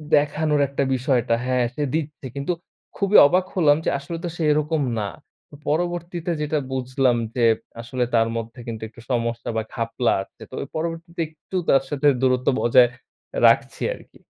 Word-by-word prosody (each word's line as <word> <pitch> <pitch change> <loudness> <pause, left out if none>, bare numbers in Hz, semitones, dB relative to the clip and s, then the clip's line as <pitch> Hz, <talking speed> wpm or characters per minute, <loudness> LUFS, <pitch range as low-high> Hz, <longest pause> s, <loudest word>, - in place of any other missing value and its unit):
দেখানোর 150 0 +2
একটা 140 +1 -1
বিষয়টা 125 -3 +1
হ্যাঁ, 125 -1 +2
সে 150 - -3
দিচ্ছে। 150 -3 -4
কিন্তু 140 +5 -2 0.5
খুবই 200 +1 +4
অবাক 185 +4 +2
হলাম 150 -5 +5
যে - - +3
আসলে 165 +4 -6
তো 175 - -2
সে 165 - -2
এরকম 150 +1 +1 0.2
না। 105 - -1 0.5
ও - - -8
পরবর্তীতে 175 +2 -1
যেটা 150 +1 0
বুঝলাম 130 -1 +1 0.2
যে 125 - +1 0.4
আসলে 125 +1 -2
তার 115 0 +4
মধ্যে 115 +2 -6
কিন্তু 110 -1 -5
একটু 115 +1 -15
সমস্যা 115 -1 -1
বা, - - +2
ঘাপলা 115 0 0
আছে। - - -25
তো - - -18
অব 140 - -8
পরবর্তীতে 165 +1 -4
একটু 155 +4 -11
তার 135 -1 +5
সাথে 145 0 +1
দূরত্ব 130 -1 +2
বজায় 120 +1 +5 0.6
রাখছি - - +2
আরকি। - - -18
140 Hz, 165 wpm, -23 LUFS, 125-160 Hz, 0.6 s, হলাম